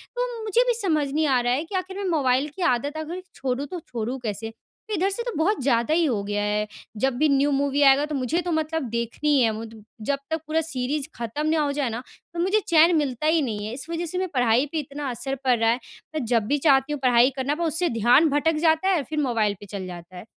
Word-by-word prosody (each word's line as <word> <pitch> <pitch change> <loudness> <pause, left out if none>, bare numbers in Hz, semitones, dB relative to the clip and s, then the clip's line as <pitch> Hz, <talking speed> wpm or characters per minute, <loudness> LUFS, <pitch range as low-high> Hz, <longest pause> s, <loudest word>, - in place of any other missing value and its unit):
तो - - -3
मुझे 435 +2 +2
भी 485 - +3
समझ 310 -7 +1
नहीं 310 +1 +1
आ 260 -2 +3
रहा 245 +1 +1
है 290 +5 0
कि 385 - -7
आख़िर 375 +1 -3
में 395 -2 -2
मोबाइल 275 -3 +2
की 380 - -7
आदत 285 +6 -2
अगर 335 +4 -5
छोड़ूँ 265 +1 -2
तो 360 -2 -6
छोड़ूँ 245 -1 -5
कैसे? 220 +1 -3 0.4
इधर 380 +3 +1
से 470 +4 -3
तो 485 - -3
बहुत 385 +4 +1
ज़्यादा 240 +2 +2
ही 335 +1 +3
हो 220 -8 0
गया 205 0 -2
है, 210 0 0 0.3
जब 265 +3 +1
भी 310 - +3
न्यू 280 +1 +3
मूवी 280 +1 +1
आएगा 275 +1 +6
तो 300 -1 -4
मुझे 275 +7 0
तो 350 0 -3
मतलब 315 -1 -1
देखनी 235 +6 -2
ही 265 - +4
है। 225 -2 +3
मु 225 +1 -6 0.4
जब 280 -1 +1
तक 320 -1 -2
पूरा 320 +1 +1
सीरीज़ 285 -1 -1
ख़त्म 240 +7 -3
ना 315 0 +2
हो 290 -1 0
जाए 280 -3 -1
ना, 230 +2 -4 0.3
तो 340 - -5
मुझे 385 +5 +2
चैन 335 +1 +5
मिलता 290 -1 0
ही 320 0 +3
नहीं 210 -5 -3
है। 225 - -5
इस 265 +2 -3
वजह 335 +1 -2
से 360 +3 -4
मैं 375 0 0
पढ़ाई 245 +1 +3
पे 320 - -1
इतना 285 -1 -5
असर 270 +3 -3
पड़ 250 -2 +4
रहा 225 0 +3
है। 240 +2 +1 0.4
मैं 300 - -1
जब 230 -2 +1
भी 290 - +2
चाहती 275 0 +3
हूँ 290 - -4
पढ़ाई 245 0 +5
करना, 275 +3 -1
पर 340 - -3
उससे 330 +2 +1
ध्यान 240 +8 +4
भटक 300 +3 +1
जाता 320 +4 +3
है 380 - +4
और 290 - -1
फ़िर 305 -1 -2
मोबाइल 225 -6 +1
पे 205 - -10
चल 195 -2 -6
जाता 175 0 -10
है। 180 - -8
285 Hz, 260 wpm, -24 LUFS, 245-320 Hz, 0.4 s, आएगा